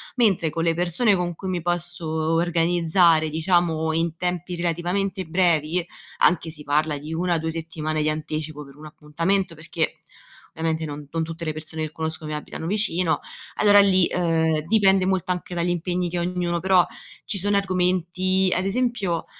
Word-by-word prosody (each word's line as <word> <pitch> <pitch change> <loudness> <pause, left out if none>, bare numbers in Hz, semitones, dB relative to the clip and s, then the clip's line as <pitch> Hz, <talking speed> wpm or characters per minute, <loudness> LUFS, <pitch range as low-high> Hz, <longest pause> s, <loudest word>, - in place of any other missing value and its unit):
mentre 200 -10 +3
con 165 +1 -3
le 165 0 +2
persone 180 +6 +2
con 175 -1 -2
cui 190 +3 -6
mi 180 -2 -2
posso 175 0 -2
o 160 0 -1
organizzare 170 -1 +3
diciamo 160 0 +1
in 165 0 -1
tempi 180 0 -3
relativamente 175 +3 -1
brevi, 170 -1 +1 0.3
anche 170 -2 +3
si 155 -2 -8
parla 150 +1 +1
di 150 +3 -7
1-2 165 -1 -1
settimane 155 -1 -3
di 150 - +1
anticipo 155 0 -4
per 140 0 -15
un 155 - -12
appuntamento, 165 +5 -1
perché 160 0 -3 0.5
ovviamente 160 0 -2
non 145 -1 -7
non 165 -1 -1
tutte 165 +1 -6
le 155 - -1
persone 155 +1 -6
che 155 - -4
conosco 160 0 -4
mi 155 - -4
abitano 150 +1 -6
vicino, 185 -3 +1 0.4
allora 205 -1 +6
lì, 190 -2 +5
ehm, 160 -3 +1
dipende 195 -2 +4
molto 185 0 0
anche 180 0 -4
dagli 170 0 0
impegni 175 +1 -1
che 175 - -3
ha - - 0
ognuno, 175 -1 -1
però 185 0 +4 0.4
ci 205 - -1
sono 200 +2 +2
argomenti 185 0 +1
ad 185 - 0
esempio 205 -5 -1
170 Hz, 170 wpm, -23 LUFS, 160-180 Hz, 0.5 s, allora